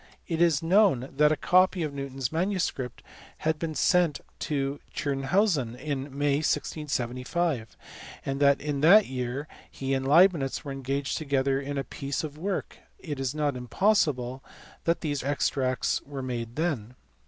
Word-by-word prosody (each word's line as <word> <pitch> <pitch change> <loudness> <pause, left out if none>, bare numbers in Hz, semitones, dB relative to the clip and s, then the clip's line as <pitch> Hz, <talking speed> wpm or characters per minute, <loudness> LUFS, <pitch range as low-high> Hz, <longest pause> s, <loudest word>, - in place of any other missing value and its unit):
It 165 -2 -1
is 165 -3 +3
known 170 - +3
that 150 0 +5
a - - +3
copy 185 +2 +3
of 150 -2 -3
Newton 140 -1 -6
s 130 -3 -1
manuscript 165 - -2 0.3
had 155 -1 -1
been 160 -2 -3
sent 175 -4 +3 0.2
to 140 -2 -2 0.2
Tschirnhausen 140 - +1
in 135 0 -3
May, 140 0 0
1675, 145 -2 -2 0.5
and 135 +1 -2
as 140 0 +5
in 145 -2 -3
that 195 +7 +7
year 130 +3 -4 0.2
he 135 0 -3
and 135 0 -1
Leibnitz 155 -3 +4
were 140 - -4
engaged 135 +1 -2
together 140 -2 0
on 145 +1 -4
a 135 - -1
piece 140 +2 -4
of 150 -2 -5
work, 185 +4 -4 0.2
it 145 -5 -6
is 135 +1 -2
not 145 -3 0
impossible 130 - +1 0.4
that 170 0 +1
these 145 -3 -2
extracts 130 -2 0
were 140 -2 -7
made 120 -2 -4
then*. 135 -8 -2
140 Hz, 155 wpm, -27 LUFS, 135-160 Hz, 0.5 s, that